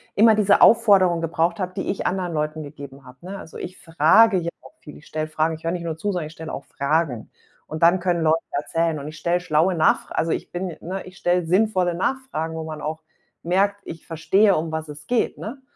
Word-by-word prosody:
immer 220 +2 +6
diese 205 -1 +3
Aufforderung 195 -7 +5
gebraucht 165 +1 0
habe, 185 -1 -3
die 190 - -3
ich 195 - -1
anderen 180 -2 -2
Leuten 155 0 -2
gegeben 140 -2 -11
habe, 125 0 -14
ne? 190 +3 -7
Also, 160 - -10
ich 185 - -7
frage 165 +7 +4
ja 170 - -3
auch - - -16
viel, 150 - -12
ich - - -17
stelle 155 0 -3
Fragen 155 +1 0
ich 160 - -15
höre 165 - -1
nicht 175 -1 -4
nur 165 -2 -4
zu, 205 +5 -2
sondern 175 -5 -3
ich 155 - -12
stelle 160 -1 -8
auch 140 - -6
Fragen 140 -4 -1 0.4
und 155 +1 -4
dann 175 +3 +5
können 175 -1 0
Leute 160 0 +4
erzählen 165 +2 -1
und 140 - -7
ich 155 +1 -9
stelle 175 +3 0
schlaue 175 +1 +1
Nachfra 160 -1 +1
also, 165 0 0
ich - - -3
bin 175 -1 -4
ne, 185 +3 -5
ich 185 0 -13
stelle 175 0 +1
sinnvolle 185 0 +2
Nachfragen, 170 -5 -3
wo 160 - -4
man 155 -1 -7
auch 155 +1 -5 0.4
merkt, 200 +3 +1
ich 165 - -9
verstehe, 180 +6 +3
um 160 +1 -3
was 160 0 -4
es 150 0 -10
geht, 245 -2 0
ne, 255 +6 -7
165 Hz, 230 wpm, -23 LUFS, 155-185 Hz, 0.4 s, immer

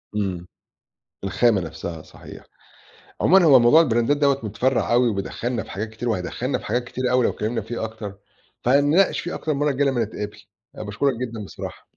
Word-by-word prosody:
امم، 95 -4 -2 0.8
الخامة 100 +1 +2
نفسها 80 -1 -6
صحيح، - - -13 0.8
عمومًا 190 0 +5
هو 140 -5 +8
موضوع 120 +7 +6
البرندات 120 -2 +2
دوّة 140 -1 +2
مُتفرّع 120 +4 0
اوي، 125 0 +4
وبيدخلنا 115 +3 -3
في - - -13
حاجات 105 +3 -4
كتير، 110 +2 -5
وهيدخّلنا 115 +6 -2
في - - -13
حاجات 120 0 -1
كتيرة 125 +1 -3
أوي 125 -1 +3
لو - - +3
اتكلِّمنا 110 +2 -2
فيه 110 +1 -5
أكتر، 110 -3 -7 0.5
فهنناقش 145 +9 +3
فيه 175 - -5
أكتر 155 - -2
المَرَّة 145 +1 +1
الجاية 140 +1 +1
لمّا 120 -4 +1
نتقابل، 105 0 -7 0.4
أنا - - -7
باشكرك 115 +7 0
جدًا 115 -3 -5
بصراحة. - - -10
120 Hz, 175 wpm, -23 LUFS, 105-135 Hz, 0.8 s, هو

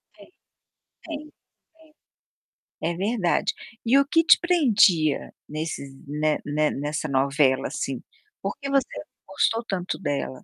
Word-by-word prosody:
Sim, - - -16 0.8
sim, 305 -2 -7 0.3
sim. 320 -1 -25 0.9
É 170 +1 0
verdade. 195 -2 +1 0.3
E 250 +4 +5
o 280 - +3
que 325 +3 +3
te - - +7
prendia 210 - +3 0.2
nesses 155 -2 -4 0.2
ne 150 +1 0
ne 150 +1 +1
nessa 150 +2 -3
novela, 135 0 +2
assim. 135 -3 -4 0.4
Por - - -3
que 275 -1 -5
você 275 -2 +3 0.4
gostou 225 +4 +1
tanto 185 -4 -3
dela? 145 -7 -1
175 Hz, 125 wpm, -25 LUFS, -, 0.9 s, te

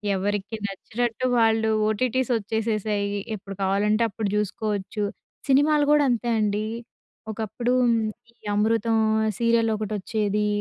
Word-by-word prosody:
ఎవరికి 205 +2 -2
నచ్చినట్టు 230 +5 -3
వాళ్ళు 225 0 +3 0.2
ఓటీటీస్ 255 +3 0
వచ్చేసేశాయి. 215 -1 -1 0.3
ఎప్పుడు 195 -1 -9
కావాలంటే 210 +4 +2
అప్పుడు 205 0 -3
చూసుకోవచ్చు. 210 0 -2 0.4
సినిమాలు 290 +2 +4
కూడా 295 -1 +5
అంతే 240 0 0
అండి. 210 0 0 0.7
ఒకప్పుడు 230 +3 -2 0.6
ఈ - - -33 0.2
'అమృతం' 225 +1 +2 0.4
సీరియల్ 230 -1 +3
ఒకటొచ్చేది. 210 0 -1
215 Hz, 100 wpm, -24 LUFS, 205-230 Hz, 0.7 s, కూడా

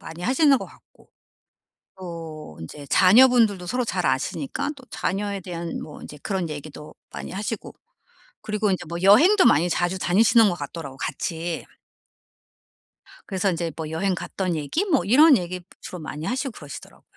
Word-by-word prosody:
많이 165 +2 -9
하시는 270 - +4
것 - - -6
같고 - - -22 0.9
또 165 - -8
인제 140 - -9
자녀분들도 215 - +5
서로 250 +7 -1
잘 - - -2
아시니까 280 +1 -1
또 270 - -14
자녀에 200 +1 -2
대한 170 -2 -5
뭐 150 - -10
이제 150 - -10
그런 190 -4 -2
얘기도 150 0 -9 0.2
많이 - - -7
하시고 210 +3 -5 0.7
그리고 210 -1 -1
인제 185 - -1
뭐 170 - -4
여행도 325 - +6
많이 160 +5 +4
자주 175 +2 0
다니시는 215 +5 +4
것 180 - 0
같더라고요 145 -3 -7
같이. 165 +4 -4 1.6
그래서 195 0 0
인제 170 -2 -2
뭐 160 -2 -5
여행 185 +4 0
갔던 180 0 -3
얘기 160 - -1
뭐 310 - +2
이런 280 +7 +7
얘기 180 0 -5 0.2
주로 180 - -7
많이 155 0 -6
하시고 265 - -2
그러시더라고요. 145 -9 -11
185 Hz, 345 characters per minute, -24 LUFS, 165-220 Hz, 1.6 s, 이런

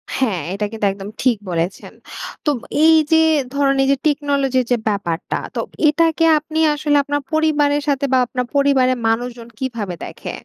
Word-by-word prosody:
হ্যাঁ, 225 -9 0
এইটা 200 +2 -2
কিন্তু 220 -2 -2
একদম 195 +1 -8
ঠিক 250 -4 +3
বলেছেন। 170 +2 -3 0.5
তোব 295 -4 +1 0.3
এইযে 320 0 +5 0.4
ধরেন 280 -1 +2
এইযে 275 +1 +2
টেকনোলজির 280 -3 +1
যে 245 - +4
ব্যাপারটা, 195 -5 -2 0.2
তো - - -2 0.3
এটাকে 325 +2 +2 0.2
আপনি 310 +1 -4
আসলে 295 0 +1
আপনার 290 +1 -2
পরিবারের 295 -2 +2
সাথে 280 -1 +1
বা, - - +5
আপনার 250 +1 -3
পরিবারের 270 -2 +3
মানুষজন 235 +1 -2
কীভাবে 230 -8 -4
দেখে? - - -7
270 Hz, 150 wpm, -19 LUFS, 230-290 Hz, 0.5 s, এইযে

